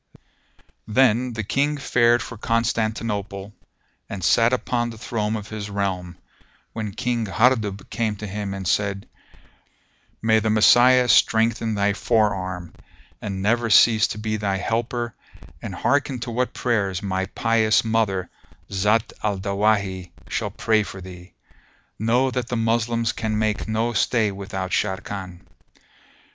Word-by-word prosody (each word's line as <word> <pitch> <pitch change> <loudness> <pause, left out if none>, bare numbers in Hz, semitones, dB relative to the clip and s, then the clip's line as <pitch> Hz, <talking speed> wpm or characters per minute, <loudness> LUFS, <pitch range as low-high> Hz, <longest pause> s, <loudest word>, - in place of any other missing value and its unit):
Then 125 +1 +2
the 110 -1 -3
King 145 +8 0
fared 120 -3 +3
for 115 - -8
Constantinople 110 -3 -2 0.6
and 95 -3 -6
sat 115 +7 +4
upon 120 -1 -1
the 115 - -9
throne 110 -1 -2
of 105 -1 -6
his 105 -1 -6
realm, 95 -3 -3 0.6
when 105 -3 -5
King 120 -3 -1
Hardub 110 -2 +1
came 110 -1 -1
to 105 - -7
him 100 -1 -4
and 95 -2 -5
said, 100 +2 0 1.1
"May 110 0 +3
the 110 0 -1
Messiah 125 +4 +6
strengthen 115 -1 +3
thy 100 0 +1
fore 110 0 +2
arm 95 -2 -6 0.5
and 95 -2 -4
never 115 +2 +1
cease 110 0 +6
to - - -6
be 110 0 -2
thy 100 -2 -1
helper 115 +2 -2 0.5
and - - -6
hearken 140 -2 0
to 120 - -4
what 125 +2 -1
prayers 100 -6 -1
my 95 -1 -1
pious 110 0 +2
mother, 110 -5 0 0.4
Zat 105 +3 +1
al 105 -2 -1
Dawahi, 100 -2 0 0.2
shall - - -2
pray 110 -1 +1
for 95 -2 -7
thee! 90 -1 -12 0.6
Know 120 +5 +2
that 125 -2 -2
the 120 - -2
Moslems 115 0 +1
can 110 -1 -2
make 110 -1 -1
no 110 +2 0
stay 110 -2 +1
without 95 -1 -5
Sharrkan." 95 -2 -3
110 Hz, 140 wpm, -23 LUFS, 100-115 Hz, 1.1 s, Messiah